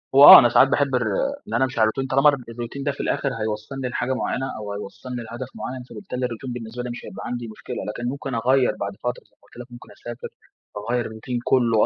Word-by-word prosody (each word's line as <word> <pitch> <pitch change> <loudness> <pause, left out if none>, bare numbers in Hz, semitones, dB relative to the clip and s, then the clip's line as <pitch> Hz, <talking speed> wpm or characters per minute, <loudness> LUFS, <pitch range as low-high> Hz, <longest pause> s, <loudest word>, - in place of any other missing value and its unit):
هو 140 - +9
آه، - - +13
أنا 120 -3 +4
ساعات 130 - +6
باحب 140 -1 +1
الر 120 -3 +1 0.4
إن - - -7
أنا 120 +3 +3
أمشي 130 -2 -5
على 110 0 +5
الروتين 135 +4 -3
طالما 135 +3 +6
الر 140 -2 0
الروتين 120 +4 -6
ده 145 - 0
في 140 - -12
الأخر 140 - 0
هيوصلني 110 +5 -3
لحاجة 125 +1 -1
معينة 130 0 -2
أو 105 -1 -5
هيوصلني 120 +5 -7
لهدف 120 +3 -7
معين، 130 0 -6
فبالتالي 125 -10 -4
الروتين 125 +1 -5
بالنسبة 120 0 -6
لي 125 - -5
مش 120 - -7
هيبقى 95 - -8
عندي 120 -1 -4
مشكلة. 110 - -8
لكن 120 +3 -3
ممكن 135 -1 -4
أغيّر 125 +2 +2
بعد 100 0 -2
فترة، 125 0 -3
زي - - -36
ما - - -74
قلت - - -21
لك، 125 - -11
ممكن 120 - -12
أسافر 120 +4 -8 0.5
وأغيّر 120 +3 -1
الروتين 110 +3 -4
كله 115 -4 +3
125 Hz, 235 wpm, -23 LUFS, 115-130 Hz, 0.5 s, آه